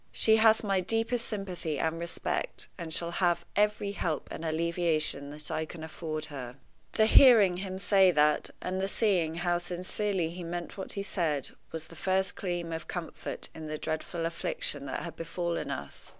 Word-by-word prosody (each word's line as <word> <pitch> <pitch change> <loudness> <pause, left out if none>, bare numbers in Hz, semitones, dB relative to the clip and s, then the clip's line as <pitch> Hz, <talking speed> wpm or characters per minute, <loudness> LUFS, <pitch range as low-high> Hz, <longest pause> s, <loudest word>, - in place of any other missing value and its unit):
She 220 0 +4
has 220 0 +5
my 195 -2 +2
deepest 225 +5 0
sympathy 185 -7 -3
and 160 +3 -1
respect, 170 - -2
and 170 -3 -6
shall 170 +1 -1
have 175 -1 +1
every 210 -1 +2
help 165 -6 -2
and 160 - -6
alleviation 160 -3 +1
that 150 +1 -5
I 160 - 0
can 160 0 -8
afford 155 -1 -4
her." 125 -3 -6 0.4
The 220 - +4
hearing 220 -6 +7
him 190 0 -4
say 195 -1 +5
that, 150 -3 +3
and 185 +1 -1
the 195 - +1
seeing 185 -7 +2
how 175 0 +1
sincerely 180 0 -2
he 175 +1 -7
meant 170 +1 -5
what 190 - -3
he 200 - -3
said, 160 -8 -1 0.2
was 160 -1 -5
the 165 - -13
first 190 +3 +1
gleam 175 -3 -3
of 160 - -5
comfort 175 -3 -5
in 160 -1 -7
the 155 0 -3
dreadful 160 +2 -3
affliction 145 -4 0
that 130 - -3
had 170 - -6
befallen 170 +1 -3
us. - - -6
175 Hz, 180 wpm, -30 LUFS, 160-195 Hz, 0.4 s, hearing